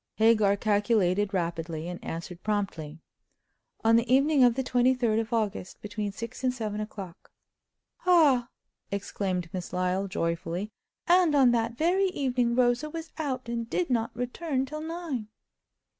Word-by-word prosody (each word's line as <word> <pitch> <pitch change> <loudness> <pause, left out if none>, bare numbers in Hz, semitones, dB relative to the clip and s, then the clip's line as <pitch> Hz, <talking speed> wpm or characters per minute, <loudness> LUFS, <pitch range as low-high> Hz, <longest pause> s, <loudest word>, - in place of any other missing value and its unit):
Hagar 215 -3 +4
calculated 205 -2 +2
rapidly, 165 -3 -3
and 175 0 -7
answered 170 +2 -6
promptly: 165 -7 -3 0.8
"On 225 +1 +5
the 235 +2 0
evening 275 +1 +5
of 240 -2 +5
the 265 - -1
23d 245 -3 +2
of 225 +1 -7
August, 215 -5 -2
between 210 0 -4
six 230 +5 -7
and 255 - +3
seven 215 -4 -4
o'clock." 195 -5 -8 0.8
"Ah!" 285 -9 +5 0.4
exclaimed 190 -3 -2
Miss 180 -2 -5
Lyle, 185 +2 0
joyfully—"and 195 - 0
on 265 -4 +6
that 230 0 0
very 370 +5 +2
evening 250 -8 0
Rosa 245 +4 +2
was 325 +1 -7
out, 260 -5 -3
and 235 -1 -3
did 345 -1 -1
not 230 -2 +1
return 260 +3 -2
till 305 +3 -6
nine!" 320 -8 -4
230 Hz, 140 wpm, -28 LUFS, 195-260 Hz, 0.8 s, on